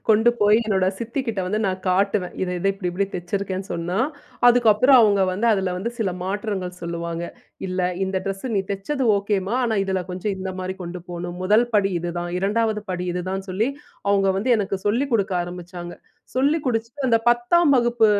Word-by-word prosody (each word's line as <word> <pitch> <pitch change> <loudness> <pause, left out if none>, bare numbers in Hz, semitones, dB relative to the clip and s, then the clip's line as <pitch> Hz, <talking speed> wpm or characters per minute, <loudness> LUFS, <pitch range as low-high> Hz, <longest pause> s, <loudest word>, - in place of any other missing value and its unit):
கொண்டு 220 +3 +5
போய் 210 +2 +5
என்னோட 190 -3 +2
சித்திக்கிட்ட 230 -2 -3
வந்து 210 +4 0
நான் 185 0 -2
காட்டுவேன். 195 0 +1
இத 185 - -1
இத 195 - -2
இப்படி 195 -2 -3
இப்பிடி 195 +3 -1
தெச்சிருக்கேன்னு 190 +1 -3
சொன்னா, 175 +3 -2 0.5
அதுக்கப்பறம் 245 +2 +6
அவுங்க 200 -3 +4
வந்து 220 +5 +1
அதில 190 -3 0
வந்து 235 +6 -3
சில 210 -5 0
மாற்றங்கள் 190 -2 -3
சொல்லுவாங்க. 170 0 -3 0.4
"இல்ல, 185 0 -2 0.2
இந்த 190 0 -2
ட்ரெஸ்ஸு 195 +6 -3
நீ 195 - +3
தெச்சது 200 +9 -2
ஓகேம்மா. 200 +1 -1
ஆனா, 230 -2 0
இதில 190 -1 -1
கொஞ்சம் 185 +3 -2
இந்தமாரி 185 0 -4
கொண்டு 175 +1 -6
போணும். 175 0 -5
1 210 +6 +4
படி 200 -2 +3
இதுதான். 175 0 -4
2வது 215 +2 +1
படி 180 0 -3
இதுதான் 185 +2 -3
சொல்லி, 200 +6 0 0.4
அவுங்க 200 -1 +3
வந்து 210 - -2
எனக்கு 195 -1 -1
சொல்லிக் 245 +6 +1
கொடுக்க 200 -3 +1
ஆரம்பிச்சாங்க. 175 0 -7 0.4
சொல்லிக் 285 +4 +2
கொடுத்துட்டு 235 +2 -2
அந்த 230 -1 +4
10ம் 240 +8 +4
வகுப்பு 240 -2 +3
195 Hz, 170 wpm, -23 LUFS, 185-225 Hz, 0.5 s, அதுக்கப்பறம்